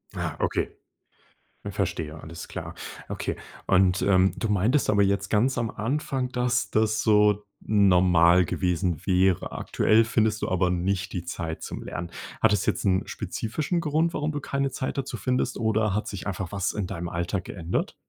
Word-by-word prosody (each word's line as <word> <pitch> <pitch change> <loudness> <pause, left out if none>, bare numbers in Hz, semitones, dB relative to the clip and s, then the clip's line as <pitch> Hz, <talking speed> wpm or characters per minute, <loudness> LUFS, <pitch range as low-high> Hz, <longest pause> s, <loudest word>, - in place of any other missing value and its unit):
Ah - - -3
okay, - - 0 1.0
verstehe 80 -1 -3
alles 80 +2 -9
klar. - - -6 0.4
Okay, - - -3 0.3
und, 95 -1 +4
ähm, 95 -1 +4
du 115 - -2
meintest 105 +8 +2
aber 100 -1 +4
jetzt 100 0 +1
ganz 120 +5 +2
am 115 -1 -1
Anfang, 130 +2 -2
dass 125 0 0
das 110 0 +2
so 105 -1 +4 0.2
normal 90 -4 +5
gewesen 90 -2 -1
wäre. 95 -1 +2
Aktuell 110 +1 +3
findest 110 -1 +1
du - - 0
aber 90 0 +1
nicht 95 +1 -1
die 90 -2 -4
Zeit 85 -2 -5
zum - - -6
Lernen. 85 0 -5 0.3
Hat 110 - +4
das 100 -3 +1
jetzt - - 0
'n 95 0 +3
spezifischen 115 - -2
Grund, 165 +1 +1
warum 150 +1 -1
du 145 - -3
keine 140 0 -1
Zeit 130 - -4
dazu 130 -3 -3
findest 125 +3 -1
oder 110 -2 +1
hat 105 - -1
sich 100 -1 -6
einfach 95 -1 -4
was 100 -2 -1
in 105 -3 -2
deinem 90 -3 -5
Alltag 85 +2 -2
geändert? 90 -4 -3
100 Hz, 170 wpm, -26 LUFS, 90-115 Hz, 1.0 s, normal